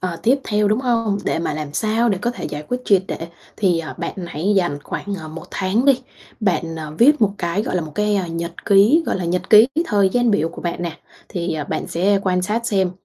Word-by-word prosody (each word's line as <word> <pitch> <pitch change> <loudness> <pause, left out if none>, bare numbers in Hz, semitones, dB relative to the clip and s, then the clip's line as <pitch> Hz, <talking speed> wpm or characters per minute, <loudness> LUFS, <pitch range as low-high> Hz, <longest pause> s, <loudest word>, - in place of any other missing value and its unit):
ờ, 180 -2 -3
tiếp 260 +5 +3
theo, 210 -1 +1
đúng 215 +4 +1
hông? 230 -5 0
Để - - 0
mà 165 -2 -2
làm 150 -1 -5
sao 220 +9 +1
để 200 -4 0
có 240 +5 -1
thể 245 - -7
giải 150 0 -5
quyết 250 - -1
triệt 195 -2 +4
để, 165 - -5 0.3
thì, 180 -5 +2
ờ, 165 - -6
bạn - - -4
hãy 170 +5 -1
dành 175 -6 +1
khoảng, 200 +6 -5
ờ, 160 - -8
1 160 +2 -8
tháng 195 +6 0
đi, 275 -2 +4 0.4
bạn, 170 -5 0
ờ, 155 -1 -7
viết 290 +5 +5
một 210 -3 +4
cái, 175 +4 -1
gọi - - -2
là, - - +1
một 155 -1 -8
cái, 210 0 +1
ơ, 190 -3 -1
nhật 170 +1 -6
ký 205 +11 +5
gọi - - 0
là 185 - -3
nhật 175 +2 -2
ký 215 +2 +9 0.2
thời 200 -6 +3
gian 245 +4 +2
biểu 165 -6 +1
của 165 - -10
bạn 175 0 -3
nè. 170 -2 -5 0.3
Thì, 175 -2 -3
ờ, 150 -2 -3
bạn - - -3
sẽ 195 +4 +2
quan 180 -2 +1
sát 220 +5 -1
xem 190 -4 +1
190 Hz, 255 wpm, -20 LUFS, 170-215 Hz, 0.4 s, ký